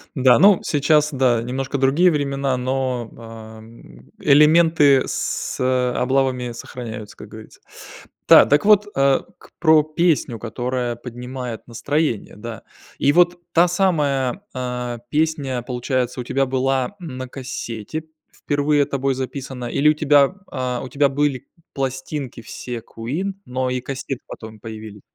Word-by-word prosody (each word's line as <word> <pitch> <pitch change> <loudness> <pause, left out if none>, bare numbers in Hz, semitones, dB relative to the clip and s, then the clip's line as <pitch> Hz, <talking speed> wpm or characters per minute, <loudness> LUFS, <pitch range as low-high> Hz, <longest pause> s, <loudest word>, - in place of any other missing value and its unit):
Да, 130 -3 +5
ну 200 -1 +6
сейчас 150 0 +2
да, 125 -4 +2
немножко 135 +3 -3
другие 155 +7 +4
времена, 140 -2 -1
но, 125 -2 -2
ам, 110 - -13
элементы 150 -1 +5
с, - - -3
э, 125 -1 +1
облавами 130 -1 0
сохраняются, 115 -3 -8
как - - -11
говорится. - - -13 0.7
Да, - - +9
так 145 +1 +3
вот, 210 0 +6
э, 135 0 +3 0.4
про 155 -2 +6
песню, 155 -6 0
которая 120 +1 -3
поднимает 125 0 -7
настроение, 140 -1 -2
да. 110 +1 -8 0.4
И 140 - +4
вот 175 +2 +3
та 175 +1 +5
самая, 155 -5 0
а, 125 -2 -4
песня 145 -5 -1
получается 125 0 -2
у - - -3
тебя 135 +2 0
была 135 +6 -1
на 130 -7 -7
кассете 125 +1 -6 0.3
впервые 145 0 +1
тобой 135 -1 -1
записана 130 -1 -5
или 140 +5 +2
у 155 - +5
тебя, 145 +2 +3 0.2
а, 125 -2 -2
у 130 - -7
тебя 140 0 +2
были 140 -2 -1 0.3
пластинки 135 -1 -4
все 120 +1 -7
Queen, 150 - -4
но 130 0 -2
и 125 -1 -2
кассеты 135 -1 -5
потом 110 -1 -10
появились? 110 -2 -9
130 Hz, 135 wpm, -21 LUFS, 125-145 Hz, 0.7 s, Да